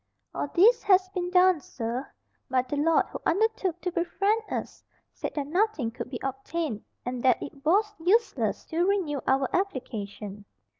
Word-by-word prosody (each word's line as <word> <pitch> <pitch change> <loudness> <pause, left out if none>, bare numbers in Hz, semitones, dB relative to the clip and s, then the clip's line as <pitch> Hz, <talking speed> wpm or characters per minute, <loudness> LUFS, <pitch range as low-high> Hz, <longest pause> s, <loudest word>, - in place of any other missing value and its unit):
"All - - -2
this 425 - +5
has 375 -1 +4
been 360 -2 -3
done, 365 -1 +5
sir; 245 -1 -5 0.4
but 255 0 +1
the 290 - -1
lord 315 +3 +3
who - - -6
undertook 390 -2 +1
to 360 - -2
befriend 395 +5 +1
us, - - -5 0.3
said - - -5
that 290 -2 -1
nothing 340 - 0
could 240 - -6
be 245 -3 -5
obtained, 270 -2 -3 0.2
and 245 0 -3
that 255 -2 +4
it 280 -1 -9
was 415 +6 +3
useless 400 +8 +1
to 330 +2 +2
renew 360 -8 0
our 265 0 +3
application." 210 - -4
325 Hz, 160 wpm, -27 LUFS, 260-375 Hz, 0.4 s, this